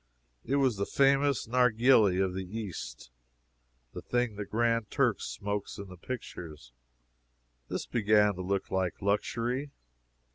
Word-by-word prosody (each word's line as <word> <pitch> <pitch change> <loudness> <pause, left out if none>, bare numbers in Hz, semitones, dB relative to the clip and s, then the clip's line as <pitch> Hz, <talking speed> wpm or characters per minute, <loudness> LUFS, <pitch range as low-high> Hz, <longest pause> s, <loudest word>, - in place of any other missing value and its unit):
It 135 - -1
was 130 -6 +2
the 100 - -1
famous 140 -2 +3
"narghili" 115 -4 +4
of 95 -1 +1
the 95 +3 -5
East 80 - -7 0.8
the - - -6
thing 120 -3 -1
the 105 0 -4
Grand 115 0 +1
Turk - - +1
smokes 100 0 -4
in 100 -1 -8
the 90 - -10
pictures. 80 - -8 0.9
This - - -4
began 105 -3 +3
to 95 - -6
look 95 +1 -2
like 95 -2 -1
luxury. 115 +7 -1
105 Hz, 135 wpm, -30 LUFS, 95-120 Hz, 0.9 s, narghili